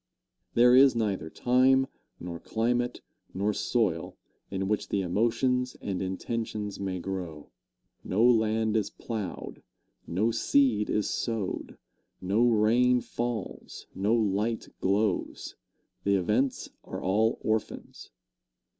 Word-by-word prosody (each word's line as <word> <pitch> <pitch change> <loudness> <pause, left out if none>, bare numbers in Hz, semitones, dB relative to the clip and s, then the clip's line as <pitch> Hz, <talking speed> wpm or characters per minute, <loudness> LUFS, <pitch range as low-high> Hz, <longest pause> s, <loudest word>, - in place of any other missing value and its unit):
There 125 +1 +6
is 135 -1 +7
neither 100 -8 -1
time, 130 +8 +3 0.3
nor 85 -1 -6
climate, 120 +4 -1 0.3
nor 100 +3 0
soil, 105 -11 -1 0.3
in 95 -1 -2
which 105 +1 -1
the 100 - 0
emotions 120 +7 0
and 95 -3 -3
intentions 105 +2 -3
may 95 -2 -2
grow. 85 -5 -6 0.5
No 105 +5 +1
land 110 -2 +3
is 105 -2 +1
plowed, 110 -4 -6 0.5
no 105 +7 +1
seed 115 -2 +2
is 105 - +1
sowed, 110 -5 -3 0.4
no 105 +6 +2
rain 120 +3 +4
falls, 120 -4 -5
no 105 +4 +1
light 110 +1 0
glows 100 0 0 0.5
the 100 0 +3
events 105 +8 0
are - - -6
all 110 +5 +1
orphans. 110 -1 -3
110 Hz, 110 wpm, -28 LUFS, 95-120 Hz, 0.5 s, is